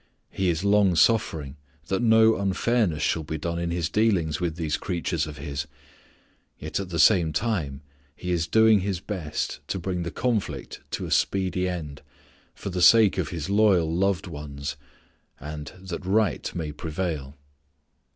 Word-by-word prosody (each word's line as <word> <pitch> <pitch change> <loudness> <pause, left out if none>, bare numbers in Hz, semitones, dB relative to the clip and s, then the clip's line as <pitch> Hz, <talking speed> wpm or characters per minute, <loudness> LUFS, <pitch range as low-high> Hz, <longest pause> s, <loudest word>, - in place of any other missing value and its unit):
He 95 -2 0
is 85 +1 -1
long 100 -3 +4
suffering 80 -9 +2 0.3
that 95 - -1
no 110 -1 +5
unfairness 100 -3 0
shall 80 - +1
be 80 0 -4
done 85 +2 -3
in 85 0 -2
His 85 -1 -1
dealings 90 -6 +1
with 85 -3 -1
these 80 -3 -1
creatures 85 -3 -2
of 75 -1 -8
His. 70 0 -4 0.9
Yet - - -4
at 95 -2 -5
the 85 - -3
same 85 0 +5
time 80 - -2 0.3
He 90 - -4
is 85 -2 0
doing 110 +3 +5
His 95 -1 -2
best 90 -6 -4
to - - -2
bring 90 0 -3
the 85 - -3
conflict 115 -2 -2
to - - -2
a - - -7
speedy 95 -1 +1
end, 75 -5 -6 0.5
for 100 - -6
the 90 0 -2
sake 100 +2 +6
of 80 -5 -1
His 80 -2 -4
loyal 100 -5 +3
loved 95 +1 +1
ones, 75 -4 -6 0.6
and 75 +1 -7
that 95 -1 -6
right 100 -1 +1
may 80 -3 -3
prevail. 75 -3 -4
90 Hz, 160 wpm, -25 LUFS, 80-100 Hz, 0.9 s, sake